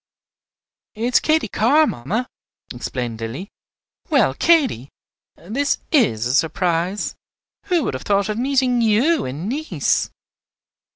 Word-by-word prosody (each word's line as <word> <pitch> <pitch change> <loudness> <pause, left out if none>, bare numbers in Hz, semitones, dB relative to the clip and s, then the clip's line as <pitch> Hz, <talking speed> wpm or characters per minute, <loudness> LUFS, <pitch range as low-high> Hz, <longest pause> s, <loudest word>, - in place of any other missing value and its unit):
"It 220 - -5
is - - +6
Katy 315 0 +1
Carr, 275 +10 +3
mamma," 210 - -2 0.5
explained 120 -2 -5
Lilly. 130 - -5 0.6
"Well, 265 - +3
Katy, 260 - +2 0.5
this 255 - -1
is 205 - +2
a 125 - 0
surprise! 170 +5 0 0.5
Who 355 -6 +1
would - - -2
have 130 - -5
thought 200 -1 +1
of 215 +1 -3
meeting 255 -2 +1
you 235 +9 +2
in 145 +8 -5
Nice!" 300 +7 -1
215 Hz, 120 wpm, -20 LUFS, -, 0.6 s, is